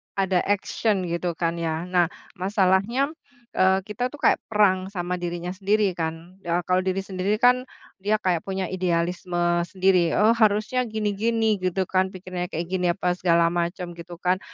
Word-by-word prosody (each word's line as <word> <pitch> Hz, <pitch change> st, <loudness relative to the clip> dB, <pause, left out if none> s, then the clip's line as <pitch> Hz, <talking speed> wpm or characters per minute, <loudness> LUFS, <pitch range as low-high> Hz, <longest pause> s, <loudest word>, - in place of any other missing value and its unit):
ada 190 Hz, -2 st, +2 dB
action 205 Hz, 0 st, 0 dB
gitu 170 Hz, 0 st, -2 dB
kan, 170 Hz, 0 st, -1 dB
ya. 160 Hz, 0 st, -2 dB
Nah, 180 Hz, -1 st, +2 dB, 0.2 s
masalahnya, 195 Hz, +8 st, +1 dB, 0.4 s
eee, 190 Hz, 0 st, +3 dB
kita 210 Hz, +5 st, -3 dB
tuh 290 Hz, -, -11 dB
kayak -, -, +4 dB
perang 190 Hz, -4 st, +2 dB
sama 180 Hz, -2 st, -3 dB
dirinya 175 Hz, 0 st, -4 dB
sendiri 200 Hz, +1 st, +1 dB
kan. 165 Hz, +2 st, -5 dB
Ya, 175 Hz, +1 st, +1 dB
kalau 185 Hz, +1 st, +2 dB
diri 190 Hz, +1 st, -1 dB
sendiri 195 Hz, +2 st, -1 dB
kan, 250 Hz, +3 st, +3 dB, 0.3 s
dia 210 Hz, +3 st, +1 dB
kayak 185 Hz, -5 st, 0 dB
punya 190 Hz, -2 st, -3 dB
idealisme 175 Hz, -1 st, 0 dB
sendiri, 185 Hz, -3 st, +2 dB
“Oh 215 Hz, +2 st, +5 dB
harusnya 225 Hz, +2 st, +2 dB
gini-gini 220 Hz, 0 st, 0 dB
gitu 185 Hz, +1 st, 0 dB
kan, 185 Hz, 0 st, +1 dB
pikirannya 185 Hz, -1 st, -5 dB
kayak 170 Hz, 0 st, -4 dB
gini, 180 Hz, -1 st, +1 dB
apa 180 Hz, -2 st, 0 dB
segala 170 Hz, -1 st, +3 dB
macam," 175 Hz, +1 st, -2 dB
gitu 170 Hz, 0 st, -10 dB
kan. 180 Hz, +2 st, 0 dB
185 Hz, 160 wpm, -24 LUFS, 175-205 Hz, 0.4 s, Oh